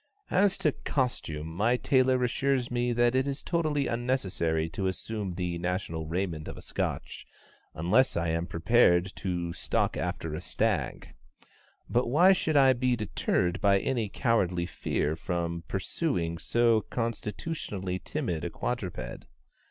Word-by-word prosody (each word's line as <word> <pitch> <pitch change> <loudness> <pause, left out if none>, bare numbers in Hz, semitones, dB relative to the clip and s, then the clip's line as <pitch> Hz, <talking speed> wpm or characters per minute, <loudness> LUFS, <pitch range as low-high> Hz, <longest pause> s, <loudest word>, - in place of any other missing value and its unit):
As 195 +1 +3
to 150 - +2
costume, 120 - -2
my 105 +10 +1
tailor 130 -1 +3
assures 125 +1 0
me 120 0 +1
that 120 0 +3
it 130 +1 +2
is 140 +1 -3
totally 155 -5 0
unnecessary 95 -10 0
to 95 +3 -2
assume 95 0 -3
the 90 -2 -2
national 85 -3 -2
raiment 85 -2 -2
of - - -7
a - - -9
Scotch, - - -4 0.5
unless 105 +12 +3
I 85 0 0
am 85 +1 -1
prepared 90 0 +3
to 85 -2 -2
stalk - - 0
after 80 -2 -3
a 75 - -4
stag. - - -1 0.7
But 120 +1 +1
why 175 +10 +6
should 160 -5 +1
I 135 -1 +7
be 125 0 +1
deterred 95 -4 -1
by 100 -1 +5
any 115 0 -1
cowardly 90 -7 +1
fear 80 -3 -1
from 85 0 -3
pursuing 95 - -1
so 115 +2 +3
constitutionally 105 - -3
timid 115 - -3
a 85 - -2
quadruped? 100 0 -4
105 Hz, 140 wpm, -29 LUFS, 85-125 Hz, 0.7 s, I